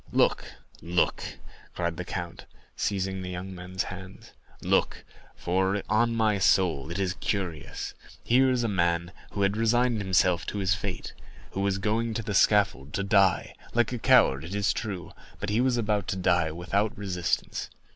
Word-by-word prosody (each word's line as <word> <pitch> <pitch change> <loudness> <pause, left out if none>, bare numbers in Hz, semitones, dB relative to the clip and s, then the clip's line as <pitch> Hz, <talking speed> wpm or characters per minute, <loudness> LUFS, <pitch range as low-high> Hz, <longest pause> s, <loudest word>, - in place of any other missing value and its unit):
"Look, - - +2 0.4
look," 90 +1 +1 0.5
cried 85 -1 -1
the 90 - -3
count, 85 -1 -6 0.3
seizing 95 -1 -1
the 90 - -5
young 90 +1 -6
men's 95 +1 -4
hands; 95 0 -9 0.3
"look, - - +1 0.3
for 95 +2 0
on 115 +2 +2
my 110 -3 +2
soul 85 -7 +2
it 85 - -4
is 95 -2 0
curious. 90 -8 -3 0.3
Here 130 +2 +4
is 125 -2 +1
a - - +1
man 85 -3 0 0.2
who 100 - 0
had 100 +1 +2
resigned 115 +1 +2
himself 95 -2 +2
to - - -3
his 95 -1 +2
fate, 100 -2 -4 0.4
who 95 - -3
was 100 -1 +1
going 110 +3 -1
to 115 - -2
the 105 - -3
scaffold 95 -9 +3
to 100 - -1
die—like 100 +4 +1
a 120 - -3
coward, 70 -8 +4
it 90 +5 -6
is 100 -1 +2
true, 95 -5 -5 0.3
but - - -3
he 110 +3 +2
was 130 -1 +2
about 105 -3 0
to - - -1
die 90 -3 +2
without 95 +6 -1
resistance. 90 -4 -2
95 Hz, 165 wpm, -27 LUFS, 90-105 Hz, 0.5 s, Here